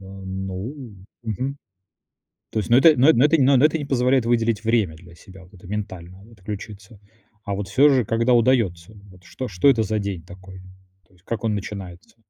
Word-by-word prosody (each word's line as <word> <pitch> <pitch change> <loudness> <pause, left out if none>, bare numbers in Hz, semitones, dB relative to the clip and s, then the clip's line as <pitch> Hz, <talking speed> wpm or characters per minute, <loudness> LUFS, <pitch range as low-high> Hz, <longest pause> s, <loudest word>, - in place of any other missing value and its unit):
Э, 95 - -14
ну, 95 +5 -7 0.3
мгм. 130 +5 -4 0.9
То - - -3
есть, 115 - -6
ну, 120 - +6
это, 155 +2 +6
ну, 130 +4 +4
эт 160 - +5
ну, 130 - +4
это, 160 +2 +4
ну 135 +1 +5
ну, 130 - +4
это 160 +1 +3
не 145 - -5
позволяет 130 -2 +1
выделить 115 -2 0
время 110 -9 +1
для 85 +1 -16
себя, 95 +2 -15
вот 90 - -22
это, 90 0 -15
ментально 95 -3 -7
отключиться. 105 +1 -9 0.5
А 100 - -3
вот 100 -1 -5
всё 135 +9 +4
же, 130 -5 +3
когда 115 +3 +1
удается? 110 -6 +1 0.2
Вот 90 -1 -19
что 130 +6 -7
что 90 +7 +2
это 115 -5 +4
за 110 +1 -1
день 100 -4 -4
такой? 95 +1 -13 0.5
То - - -32
есть, 90 +1 -28
как 115 -1 -5
он 110 -2 0
начинается? 95 -2 -8
105 Hz, 205 wpm, -22 LUFS, 95-125 Hz, 0.9 s, ну